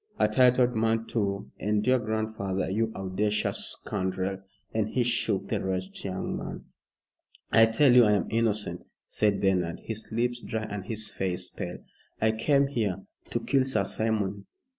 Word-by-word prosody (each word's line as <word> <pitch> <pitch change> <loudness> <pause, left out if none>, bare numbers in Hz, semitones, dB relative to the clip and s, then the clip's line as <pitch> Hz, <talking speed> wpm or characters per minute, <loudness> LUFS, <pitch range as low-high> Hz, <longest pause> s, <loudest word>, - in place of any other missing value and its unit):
A - - +4
titled 125 +2 +4
man, 115 0 +1
too, 100 -4 -2
and 105 0 0
your 130 0 +4
grandfather 110 -4 -2
you 110 +3 0
audacious 100 +2 0
scoundrel!" 95 -1 -3 0.3
and 110 -1 0
he 125 - +1
shook 115 -5 +1
the - - -1
wretched 95 0 -3
young 95 -1 -3
man. - - -6 0.9
"I 115 0 +7
tell 120 +4 +4
you 125 -2 +8
I 105 - +4
am 100 - +1
innocent," 110 -2 0 0.2
said 105 -2 +1
Bernard, 90 -4 +1
his 110 0 -5
lips 120 +2 0
dry 110 -1 -3
and 105 -3 -5
his 110 -1 -3
face 90 -2 -2
pale. - - -6 0.4
"I 110 0 +3
came 140 +6 +3
here 105 -9 -2
" - - -28
"To 120 - -1
kill 135 +3 +2
Sir 130 0 0
Simon. 100 -3 -1
110 Hz, 160 wpm, -28 LUFS, 100-115 Hz, 0.9 s, you